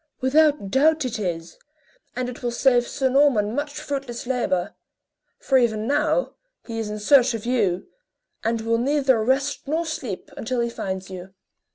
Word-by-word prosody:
"Without 285 -5 +2
doubt 305 +3 +3
it 230 -3 -3
is, 170 -4 -4 0.6
and 250 0 -2
it 250 0 -8
will 245 - -1
save 240 0 +2
Sir 270 - 0
Norman 255 -6 +3
much 290 +3 -2
fruitless 275 -5 -5
labor; 235 -8 -1 0.6
for 265 -1 +2
even 220 -3 0
now 300 - +1 0.3
he 225 -1 -5
is 220 -2 -3
in 210 - -4
search 255 +3 +4
of 225 - -6
you, 205 -7 0 0.6
and 225 0 0
will 230 +1 0
neither 265 -3 +2
rest 270 +4 0
nor 320 +4 0
sleep 280 - -5
until 255 -3 -3
he 235 0 0
finds 190 -3 -5
you." 185 +1 -9
245 Hz, 165 wpm, -23 LUFS, 215-280 Hz, 0.6 s, search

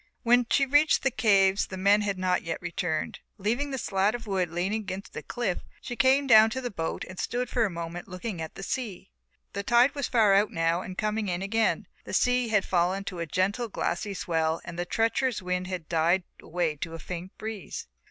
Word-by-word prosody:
When 245 0 +4
she 275 - +3
reached 290 +3 +4
the 270 - +2
caves 195 -4 +3
the 190 - -7
men 200 +2 +4
had 200 -2 -1
not 185 -1 +1
yet 165 -1 -4
returned; 170 -2 -3 0.2
leaving 235 +8 -1
the 270 - -3
slat 200 -1 +1
of 240 - -7
wood 190 -4 0
leaning 185 +6 -1
against 190 -1 -7
the - - -5
cliff 225 -7 -2 0.2
she 245 - -6
came 265 +3 +4
down 220 -4 +7
to 260 - -3
the 245 -2 -4
boat 165 -4 -3
and 185 -1 -9
stood 245 +5 -2
for 235 -2 +2
a - - -1
moment 170 +1 -6
looking 185 -1 -5
at 160 - -6
the 195 - -7
sea. 205 - -4 0.4
The 200 - -2
tide 240 +6 +4
was 280 -3 -2
far 220 -5 +4
out 205 +2 +4
now 165 +1 0
and 185 0 -8
coming 215 0 -1
in 180 0 -2
again, 225 +3 +1 0.2
the - - -8
sea 250 -1 +2
had 210 -3 +2
fallen 185 +2 +1
to 185 -3 -6
a 170 - -3
gentle 200 - 0
glassy 200 0 -2
swell 160 -2 0
and 175 0 -7
the 175 - -1
treacherous 230 +3 +1
wind 180 0 -2
had 180 -4 -5
died 170 +3 +2 0.2
away 165 -3 -1
to 165 +3 -5
a - - -5
faint 180 +3 -7
breeze. 215 -6 -6
195 Hz, 215 wpm, -27 LUFS, 175-230 Hz, 0.4 s, down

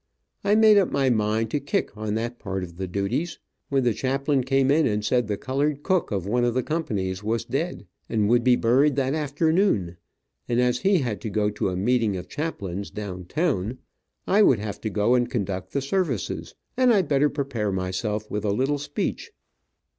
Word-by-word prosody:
I 200 +1 +3
made 215 -1 +7
up 195 - +1
my 135 -2 +2
mind 110 0 0
to 150 - 0
kick 140 -6 -2
on 105 0 -3
that 120 +2 -3
part 95 -2 -4
of 85 -1 -9
the 95 0 -3
duties, 100 - -2 0.3
when 135 -2 +2
the 120 -2 +2
chaplain 135 +2 0
came 135 +1 +2
in 155 +1 +4
and 105 -2 -1
said 125 0 +1
the 105 -1 -2
colored 140 +4 -1
cook 185 -2 +1
of 95 -4 -2
one 120 +4 +1
of 120 0 +1
the 130 - +1
companies 105 - -2
was 115 +1 -1
dead, - - -3 0.2
and 105 -2 +1
would 120 +2 +3
be 125 0 +5
buried 130 +5 +3
that 135 -1 0
afternoon, 150 - +1 0.5
and 120 0 +2
as 125 0 +2
he 195 +5 +3
had 115 -5 -3
to 110 - -4
go 105 +1 0
to 105 -2 -1
a 90 - -3
meeting 110 -1 +1
of 90 - -7
chaplains 100 - -4
down 95 -4 -6
town, 130 - -1 0.5
I 205 +3 +4
would 135 - +5
have 105 -1 -6
to 110 - -2
go 105 +3 +2
and 120 -1 +2
conduct 95 -6 -3
the 140 - -1
services, 140 - -2 0.2
and 255 -1 +4
I 205 -4 +4
better 145 -1 +2
prepare 135 -8 -2
myself 95 +3 -2
with 105 0 -2
a 105 - +1
little 135 +7 0
speech. 145 0 -3
120 Hz, 200 wpm, -25 LUFS, 105-140 Hz, 0.5 s, made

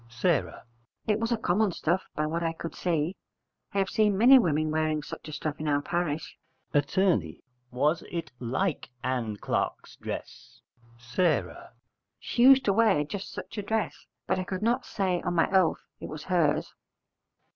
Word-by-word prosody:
S. 120 +5 -8 0.8
It 210 0 +1
was 230 +1 -1
a 235 - +2
common 210 0 +1
stuff, 175 +3 -1
by 150 - 0
what 165 +2 -2
I 165 -1 0
could 165 0 -6
see. 170 0 -1 0.6
I - - -4
have 195 -1 +1
seen 210 -3 +2
many 255 +5 +8
women 155 -6 +1
wearing 155 -1 0
such - - -8
a - - -6
stuff 150 0 -4
in 155 - -3
our 145 -1 +1
parish. 165 -3 -2 0.3
Att. 145 +2 0 0.7
Was 145 +6 +1
it 170 -4 -4
like 130 +8 -2
Ann 120 -5 -2
Clark's - - -3
dress? - - -8 0.6
S. 155 - +3 0.7
She 240 - -2
used 265 +1 +7
to 200 - +3
wear 205 -8 +4
just 195 +7 -6
such 225 - -7
a - - -1
dress: 220 +1 -2 0.2
but - - 0
I - - -1
could 185 +2 -4
not 245 +3 +1
say 185 -3 0
on 175 - -2
my 165 - +4
oath 190 -3 +2
it - - -7
was 150 -1 -7
hers. 160 -5 +1
170 Hz, 170 wpm, -28 LUFS, 150-200 Hz, 0.8 s, many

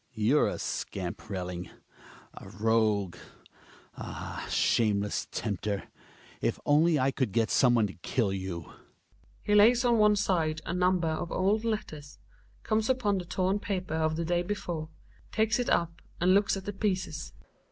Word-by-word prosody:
You're 115 +7 +3
a - - -3
scamp, - - -5
Relling! 90 -3 -4 0.6
A - - -11
rogue! 105 -3 +1 0.8
Ah! - - -6
shameless 105 -3 +1
tempter! 100 -1 -3 0.6
If - - 0
only 155 +2 +4
I 135 0 +2
could 130 -6 -1
get 115 +1 +1
some 125 -2 +4
one 115 -2 +3
to 100 - -5
kill 100 +3 -1
you 95 -4 -4
I - - -15 0.7
He 210 - 0
lays 235 +4 +6
on 235 -2 +4
one 210 0 +5
side 165 -6 0
a - - -3
number 180 -1 +2
of 160 +2 -3
old 205 +4 +1
letters, 155 -11 -4 0.5
comes 220 +1 0
upon 210 -7 +1
the 180 - -6
torn 190 +3 0
paper 185 -5 -3
of 160 -1 +1
the 165 +1 -2
day 175 +1 +1
be/ore, 175 -4 -4 0.4
takes 220 +2 +1
it 245 - -1
up 170 0 0 0.2
and 180 +2 +4
looks 200 0 +3
at 195 - -8
the 205 - -4
pieces. 190 -2 -2
165 Hz, 160 wpm, -29 LUFS, -, 0.8 s, lays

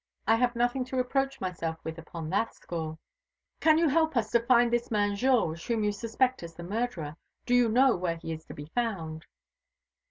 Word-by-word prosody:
I 225 - +5
have 245 0 +1
nothing 245 +2 +1
to 255 - -6
reproach 270 +2 0
myself 165 -3 -3
with 160 +1 -5
upon 165 -1 -7
that 215 +4 0
score." 160 -2 -5 0.6
"Can 315 -1 +5
you 330 0 +4
help 315 -1 +2
us 220 -2 0
to 235 - +5
find 240 -1 +4
this 240 0 0
man 205 -2 +1
Georges, 200 -9 +1
whom 230 -2 0
you 210 - +2
suspect 235 +5 0
as 165 -1 -9
the 170 - -8
murderer? 180 -6 -3 0.3
Do 245 - 0
you 245 -2 +5
know 255 +3 +5
where 175 -2 -1
he 165 -1 -5
is 160 0 -8
to - - -10
be 145 - -7
found?" 170 -10 -2
225 Hz, 200 wpm, -29 LUFS, 170-245 Hz, 0.6 s, I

